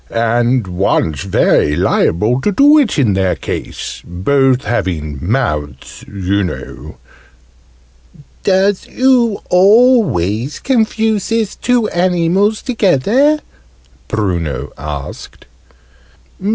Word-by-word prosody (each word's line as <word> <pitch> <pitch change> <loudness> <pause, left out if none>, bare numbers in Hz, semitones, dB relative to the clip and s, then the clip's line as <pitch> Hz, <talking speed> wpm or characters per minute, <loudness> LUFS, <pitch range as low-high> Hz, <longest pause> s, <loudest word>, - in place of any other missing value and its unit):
And 120 +1 0
one's 90 -3 -1
very 75 -5 +2
liable 110 - +1
to 205 - 0
do 290 +8 +5
it 255 -11 0
in 120 -8 +2
their 95 -1 0
case - - -6
both 130 +9 +1
having 80 - -3
mouths, 75 - -3
you 100 0 -2
know 90 - -7 0.7
" 60 - -27
"Doos 195 0 +1
oo 245 -5 +1
always 180 - +3
confuses 220 -3 0
two 245 -3 0
animals 180 +4 +1
together?" 245 - +2 0.7
Bruno 85 - -3
asked. 75 0 -8
130 Hz, 90 wpm, -15 LUFS, -, 0.7 s, do